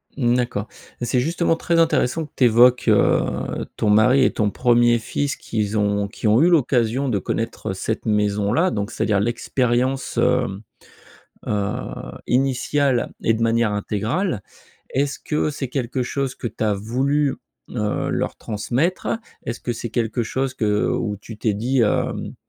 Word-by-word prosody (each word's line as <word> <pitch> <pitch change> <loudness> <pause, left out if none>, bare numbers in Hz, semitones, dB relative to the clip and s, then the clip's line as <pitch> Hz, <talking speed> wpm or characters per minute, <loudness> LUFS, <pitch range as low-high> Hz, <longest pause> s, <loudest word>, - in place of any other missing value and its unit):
Mmh, 120 -3 +2
d'accord. 120 -4 -1 0.3
C'est 120 +1 +1
justement 165 +5 +1
très 165 +1 +1
intéressant 160 -2 +2
que 150 - -17
tu 130 - +4
évoques, 120 +2 +5
heu, 110 -2 +1
ton 105 - 0
mari 110 +6 +5
et - - +3
ton 105 -2 0
1er 120 +1 +3
fils 140 +5 -2
qu'ils 105 -1 -2
ont 100 -1 +1
qui 110 +2 -4
ont 110 +5 +5
eu 170 - +5
l'occasion 130 -4 +2
de 105 -5 +1
connaître, - - -3
heu, - - -2
cette - - -3
maison 105 -1 +1
là, 180 +7 +2
donc, 100 +2 -3
c'est - - -2
à - - +1
dire, 105 -2 +2
l'expérience, 125 +4 0
hem, 95 +1 +1 0.9
heu, 100 -2 0 0.5
initiale 135 0 +1
et 115 - +3
de 115 +1 -2
manière 115 -1 +2
intégrale. 105 - -1 0.5
Est-ce 140 +1 -1
que 150 0 -1
c'est 140 -2 -4
quelque 125 0 -2
chose 135 +1 -2
que - - -6
tu 110 - -6
as 105 -1 +2
voulu, 135 +7 0 0.3
heu, 105 -3 -1
leur - - -2
transmettre? 125 - -2 0.4
Est-ce 115 - -4
que 120 - -2
c'est 115 0 -5
quelque 115 0 -1
chose 130 +4 -2
que 105 -4 +1
où 105 -3 -1
tu 105 +2 -11
t'es 110 -1 0
dit, 125 +6 0
hem: 105 - -1
120 Hz, 170 wpm, -22 LUFS, 105-135 Hz, 0.9 s, évoques